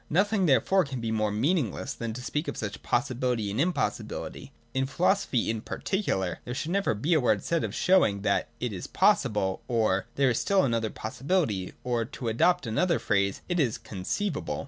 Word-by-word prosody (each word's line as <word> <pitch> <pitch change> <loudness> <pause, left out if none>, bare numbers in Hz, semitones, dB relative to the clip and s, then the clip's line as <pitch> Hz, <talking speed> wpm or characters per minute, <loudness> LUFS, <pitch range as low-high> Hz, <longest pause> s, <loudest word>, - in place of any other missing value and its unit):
Nothing 195 +2 +2
therefore 155 +8 +4
can 135 -3 -5
be 115 -1 -2
more 110 -1 +1
mean 140 - +2
ingless 130 - -3
than 115 -1 -4
to 125 +2 -7
speak 150 +4 -2
of 145 - -4
such 100 -3 -5
possibility 120 -4 0
and 105 - -3
impossi 175 +4 +1
bility. - - -7 0.2
In 130 0 0
philosophy, 170 - +1
in 110 -1 -1
particular, 95 - -2
there 125 - -5
should 155 +5 -3
never 200 - +1
be 145 +12 0
a 160 - +5
word 110 -6 +2
said 170 -1 0
of - - -3
showing 140 - +3
that - - +1
'It - - -2
is - - -6
possible,' 95 -3 +2
or 110 -6 +1
'There 135 -2 +3
is 115 - 0
still 195 -1 +3
another 115 -3 0
possibility,' 110 - -1
or, 120 -2 0
to 125 0 -5
adopt 175 +10 +2
another 170 +10 +1
phrase 100 -1 0
ology, - - -32
' - - -28
It 175 -1 0
is 125 -8 +1
conceivable.' 115 - -3
125 Hz, 200 wpm, -28 LUFS, 110-170 Hz, 0.2 s, a